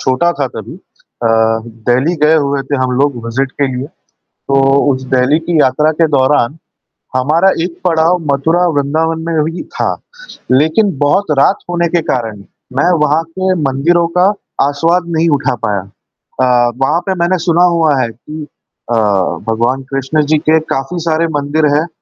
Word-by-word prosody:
छोटा 130 +7 +1
था - - -2
तभी। - - -8
अ, 310 - -7 0.6
दिल्ली 135 +8 +2
गए 155 +1 +5
हुए 140 -2 0
थे 140 +2 -2
हम 130 - 0
लोग 140 -2 +1
विज़िट 130 +3 -2
के 140 - 0
लिए। 130 +2 -4 0.4
तो 135 - -6 0.4
उस 130 0 -4
दिल्ली 130 +5 +3
की 165 0 -1
यात्रा 145 +4 +3
के 165 +1 +2
दौरान, 135 -1 +2 0.6
हमारा 155 +9 +3
एक 175 -1 -5
पड़ाव 165 +1 +3
मथुरा 160 +6 +1
वृंदावन 160 +2 0
में 165 -2 0
भी 165 +3 -4
था। - - -1 0.6
लेकिन 160 +7 +2
बहुत 155 +5 +1
रात 190 +8 +3
होने 170 -1 0
के 170 - +3
कारण, 115 -4 -2 0.4
मैं 175 +5 +3
वहाँ 150 +2 +2
के 185 +3 -2
मंदिरों 170 +6 +1
का 190 +3 +4 0.3
आसवाद 165 +5 0
नहीं 165 +1 +2
उठा 135 -2 -1
पाया। 100 -1 0
अ, 120 +5 -2
वहाँ 155 +5 +2
पे 190 - -1
मैंने 175 +2 +1
सुना 170 +1 +2
हुआ 155 -5 +2
है 115 - -1
कि 150 +7 -9 0.5
अ, 120 - +2 0.5
भगवान 120 +4 0
कृष्ण 135 +3 0
जी 155 - +4
के 155 +1 +2
काफ़ी 155 +3 -4
सारे 160 +1 +1
मंदिर 145 +2 0
हैं। 155 +3 +1
150 Hz, 165 wpm, -14 LUFS, 135-170 Hz, 0.6 s, गए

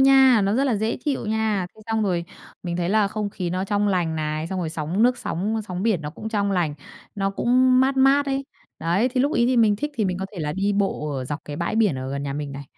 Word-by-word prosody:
nha, 265 -3 +6
nó 200 - +1
rất 270 +4 +2
là 245 -6 +1
dễ 220 +3 -1
chịu 280 -6 -1
nha. 215 -3 0
Thế 220 - -17
xong 225 -1 0
rồi 180 -4 0 0.4
mình 175 -1 -3
thấy 175 0 -1
là 210 0 +3
không 210 -1 -3
khí 180 -3 -4
nó 185 +2 -1
trong 205 0 +1
lành 175 -4 0
này, 155 +1 -2
xong 190 +2 -4
rồi 165 -3 -2
sóng 165 +6 -1
nước, 250 +1 +3
sóng, 200 +6 -2
á, - - -1
sóng 180 0 -3
biển 215 -6 +1
nó 150 - -4
cũng 220 - -7
trong 205 -2 0
lành, 170 -6 0 0.4
nó 195 -1 0
cũng 255 +4 +3
mát 270 +1 +2
mát 275 +2 +4
ấy. 275 0 -1 0.3
Đấy, 175 +9 +1
thì 255 0 -1
lúc 285 +4 +2
ấy 235 0 +3
thì 255 0 +2
mình 220 -3 +4
thích 295 +7 -3
thì 220 - 0
mình 185 -1 -1
có 190 - -3
thể 185 - -8
là 150 -1 -2
đi 195 +3 0
bộ 195 -7 -1
ở 130 - -3
dọc 145 +4 -4
cái 145 - -6
bãi 170 +6 -2
biển 210 -10 +3
ở 130 +1 -5
gần 140 0 -3
nhà 140 -1 -3
mình 145 -1 -4
này 140 +1 -7
200 Hz, 280 wpm, -23 LUFS, 170-230 Hz, 0.4 s, nha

